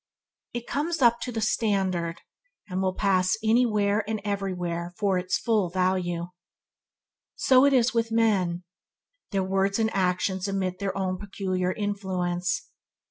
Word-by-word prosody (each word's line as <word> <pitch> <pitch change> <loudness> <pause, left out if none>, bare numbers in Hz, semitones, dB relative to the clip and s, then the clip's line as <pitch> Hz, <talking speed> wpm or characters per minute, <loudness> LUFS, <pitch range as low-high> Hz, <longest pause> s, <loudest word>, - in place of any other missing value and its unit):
It 240 0 -4
comes 325 +4 -2
up 235 0 +5
to 250 - -3
the 225 -2 -3
standard, 190 -6 0 0.5
and 185 -1 -2
will 185 -1 0
pass 185 +1 +2
anywhere 215 -2 +2
and 220 -1 -1
everywhere 180 -4 -3
for 195 -3 +1
its 180 0 0
full 215 -6 +1
value. 180 -1 0 1.1
So 255 -1 +5
with 235 -3 +2
men. 195 -6 +1 0.7
Their 195 -3 0
words 195 +1 +1
and 220 -1 0
actions 185 0 0
emit 190 -2 -2
their 195 -1 -2
own 185 -1 -1
peculiar 185 -2 -2
influence. 185 -3 -2
195 Hz, 130 wpm, -26 LUFS, 185-220 Hz, 1.1 s, up